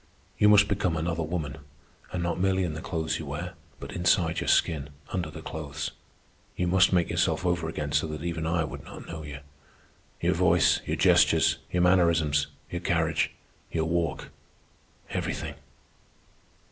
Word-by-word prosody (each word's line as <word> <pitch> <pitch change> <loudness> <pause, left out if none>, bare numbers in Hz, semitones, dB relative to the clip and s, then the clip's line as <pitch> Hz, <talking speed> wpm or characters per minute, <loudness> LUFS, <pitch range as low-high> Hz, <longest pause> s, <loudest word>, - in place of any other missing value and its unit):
You 105 - +6
must 105 -1 +7
become 95 -5 0
another 85 +1 -1
woman—and 75 +1 -6
not 85 0 -1
merely 95 0 +2
in 85 -3 -2
the 80 - -6
clothes 80 -3 -2
you 80 - -6
wear, 85 +6 -5 0.3
but - - -7
inside 85 -1 +2
your - - -4
skin 75 -3 +2 0.2
under 90 -4 -2
the - - -9
clothes. 75 -3 -5 0.6
You 90 - 0
must 95 +1 +4
make 90 -2 +2
yourself - - +1
over 85 -2 0
again 75 -2 -4
so 80 - +2
that 75 0 -6
even 85 -2 -2
I 85 0 +1
would 75 - -6
not - - -10
know 85 -2 -7
you—your 70 -1 -7
voice, - - +4
your - - 0
gestures, - - +4
your 90 0 +2
mannerisms, 80 -5 +3 0.2
your 85 - -3
carriage, 85 -2 +1 0.4
your 80 -1 0
walk, 85 0 -1 0.8
everything." 80 -1 -3
80 Hz, 155 wpm, -27 LUFS, 75-90 Hz, 0.8 s, must